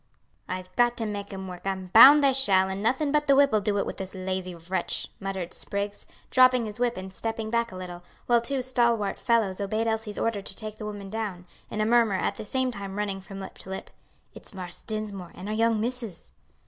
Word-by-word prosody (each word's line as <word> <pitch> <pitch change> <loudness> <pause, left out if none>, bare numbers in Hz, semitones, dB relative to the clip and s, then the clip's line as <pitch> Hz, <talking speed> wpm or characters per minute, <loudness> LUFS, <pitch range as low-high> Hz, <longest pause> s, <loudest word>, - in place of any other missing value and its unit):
"I've 185 0 -6
got 240 0 +3
to 225 - 0
make 205 -1 -5
'em 190 -1 -6
work; 180 +1 -8
I'm 190 -2 -3
bound 285 +6 +10
they 275 -1 +5
shall, 195 -8 +4
and 190 +1 -4
nothing 260 +7 +1
but 295 0 +1
the 275 - +6
whip'll 275 -6 +5
do 205 0 0
it 200 - +1
with - - -5
this 190 0 -6
lazy 185 -1 -3
wretch," 175 +2 -2
muttered 190 -3 -4
Spriggs, 200 0 -3 0.2
dropping 255 -2 +5
his 210 +1 -6
whip 240 -1 +1
and 190 0 -7
stepping 225 +1 -4
back 235 -1 +1
a - - -9
little, 180 -1 -7 0.2
while 240 -1 +4
two 260 +2 -1
stalwart 235 -5 +1
fellows 215 -5 +1
obeyed 215 +3 -1
Elsie's 220 -2 -2
order 225 -3 -1
to 195 - -3
take 215 0 -5
the 215 - -6
woman 200 -2 -7
down, 205 -5 -4 0.2
a - - -5
murmur 230 -3 +4
at - - 0
the - - -8
same 260 +3 0
time 200 -3 -6
running 200 -2 -2
from 195 +1 -9
lip 190 - -9
to - - -7
lip, 190 - -6 0.4
"It's - - -8
Marse 180 -2 -6
Dinsmore, 210 -5 -4
and 185 - -8
our 215 - -2
young 225 0 +2
missus." 230 - -4
210 Hz, 220 wpm, -27 LUFS, 190-235 Hz, 0.4 s, bound